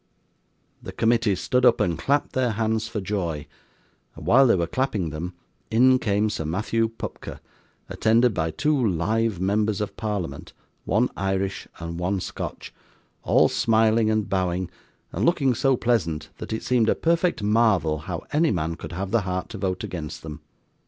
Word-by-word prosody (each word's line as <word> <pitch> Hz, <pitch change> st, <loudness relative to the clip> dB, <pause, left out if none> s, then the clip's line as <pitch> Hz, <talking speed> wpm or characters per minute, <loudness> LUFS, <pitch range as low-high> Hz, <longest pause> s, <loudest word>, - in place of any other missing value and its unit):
The -, -, -7 dB
committee 115 Hz, -3 st, +2 dB
stood 125 Hz, +7 st, 0 dB
up 120 Hz, -2 st, +5 dB
and 85 Hz, -, +1 dB
clapped 140 Hz, -, 0 dB
their 125 Hz, -3 st, +1 dB
hands 110 Hz, +1 st, 0 dB
for 110 Hz, -, -4 dB
joy, 90 Hz, -7 st, -3 dB, 0.7 s
and 80 Hz, -, -10 dB
while 130 Hz, +9 st, +6 dB
they 115 Hz, -, +5 dB
were 85 Hz, -2 st, 0 dB
clapping 100 Hz, -, -1 dB
them, 85 Hz, +4 st, -5 dB, 0.3 s
in 130 Hz, +3 st, +5 dB
came 105 Hz, -1 st, +1 dB
Sir 90 Hz, -, -3 dB
Matthew 110 Hz, +8 st, 0 dB
Pupker, 115 Hz, -, -8 dB, 0.5 s
attended 115 Hz, +1 st, +3 dB
by 80 Hz, -3 st, -1 dB
two 150 Hz, -, +1 dB
live 110 Hz, +2 st, 0 dB
members 105 Hz, +3 st, +1 dB
of 100 Hz, -2 st, -4 dB
Parliament, 105 Hz, -6 st, -4 dB, 0.3 s
one 115 Hz, +5 st, +2 dB
Irish 95 Hz, 0 st, -2 dB
and 85 Hz, 0 st, -6 dB
one 95 Hz, +2 st, 0 dB
Scotch, -, -, -6 dB, 0.5 s
all -, -, +4 dB
smiling 110 Hz, 0 st, +2 dB
and 110 Hz, -1 st, 0 dB
bowing, 90 Hz, -1 st, -1 dB, 0.4 s
and 95 Hz, -, -3 dB
looking 135 Hz, -4 st, +3 dB
so 135 Hz, +2 st, +2 dB
pleasant 85 Hz, -12 st, 0 dB
that -, -, -7 dB
it 110 Hz, -, -3 dB
seemed 120 Hz, -3 st, +2 dB
a -, -, +3 dB
perfect 170 Hz, -, +1 dB
marvel 105 Hz, -8 st, +2 dB
how 85 Hz, +2 st, -5 dB
any 160 Hz, +2 st, +3 dB
man 85 Hz, -3 st, -1 dB
could 80 Hz, 0 st, -8 dB
have 95 Hz, +2 st, -4 dB
the 115 Hz, -, +3 dB
heart 90 Hz, -1 st, -3 dB
to -, -, -7 dB
vote 95 Hz, -2 st, -2 dB
against 80 Hz, -3 st, -6 dB
them. 75 Hz, -2 st, -8 dB
105 Hz, 165 wpm, -24 LUFS, 90-115 Hz, 0.7 s, while